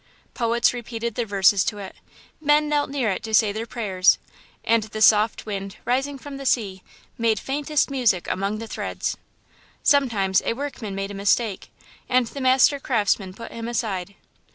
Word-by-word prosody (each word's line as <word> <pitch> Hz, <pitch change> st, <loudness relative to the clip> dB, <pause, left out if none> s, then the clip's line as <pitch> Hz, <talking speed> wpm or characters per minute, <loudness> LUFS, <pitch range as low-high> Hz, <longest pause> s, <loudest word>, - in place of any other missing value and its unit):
"Poets 235 Hz, 0 st, +2 dB
repeated 235 Hz, -1 st, -4 dB
their 235 Hz, +1 st, -2 dB
verses 195 Hz, -1 st, +4 dB
to 210 Hz, -, -2 dB
it, 195 Hz, -2 st, -8 dB, 0.5 s
men 300 Hz, 0 st, +3 dB
knelt 295 Hz, -1 st, 0 dB
near 265 Hz, -6 st, 0 dB
it -, -, -3 dB
to 220 Hz, -1 st, -1 dB
say 215 Hz, -2 st, +4 dB
their 220 Hz, +3 st, -5 dB
prayers, 195 Hz, -6 st, +2 dB, 0.5 s
and 230 Hz, 0 st, +3 dB
the 215 Hz, 0 st, -7 dB
soft 215 Hz, 0 st, +4 dB
wind, 195 Hz, -2 st, -5 dB
rising 270 Hz, +3 st, 0 dB
from 275 Hz, +1 st, -9 dB
the 275 Hz, -, -8 dB
sea, 195 Hz, -7 st, 0 dB, 0.4 s
made 225 Hz, -2 st, +2 dB
faintest 290 Hz, +1 st, -1 dB
music 235 Hz, -10 st, +1 dB
among 195 Hz, +3 st, -1 dB
the 225 Hz, -, -6 dB
threads. -, -, -3 dB, 0.7 s
"Sometimes 225 Hz, -10 st, +3 dB
a -, -, 0 dB
workman 240 Hz, -6 st, -5 dB
made 195 Hz, +1 st, -4 dB
a -, -, -7 dB
mistake, 200 Hz, +1 st, 0 dB, 0.4 s
and 255 Hz, -1 st, +3 dB
the 275 Hz, +4 st, -7 dB
Master 260 Hz, +2 st, +4 dB
Craftsman 205 Hz, -7 st, 0 dB
put 230 Hz, +1 st, -9 dB
him 230 Hz, 0 st, -6 dB
aside. 200 Hz, -5 st, -3 dB
225 Hz, 170 wpm, -23 LUFS, 200-260 Hz, 0.7 s, verses